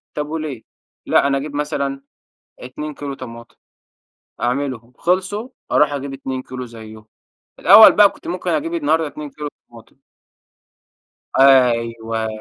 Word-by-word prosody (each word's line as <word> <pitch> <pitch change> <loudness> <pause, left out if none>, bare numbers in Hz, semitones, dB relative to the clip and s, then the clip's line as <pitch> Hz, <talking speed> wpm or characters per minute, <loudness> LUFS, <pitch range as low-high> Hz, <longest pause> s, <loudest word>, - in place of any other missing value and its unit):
طب 150 0 -3
وليه؟ 155 -7 -5 0.4
لأ - - +3
أنا 140 0 +1
أجيب 145 +1 -6
مثلًا 140 -2 -3 0.6
2 150 +4 -7
كيلو 140 -1 -6
طماطم. 115 -2 -11 0.8
أعملهم 125 -2 -2
خلصوا، 190 +6 -1 0.2
أروح 150 -1 +3
أجيب 140 -1 -4
2 130 -1 -5
كيلو 130 -1 -7
زيّهم. 110 -2 -12 0.5
الأول 220 - +9
بقي 205 -1 +7
كنت - - -14
ممكن 180 +1 -3
أجيب 165 +2 -1
النهارده 160 0 +1
2 150 0 -8
كيلو 150 +2 -7 0.2
طماطم. 115 -2 -17 1.4
أيوه، 115 -4 +3
140 Hz, 125 wpm, -19 LUFS, 120-150 Hz, 1.4 s, الأول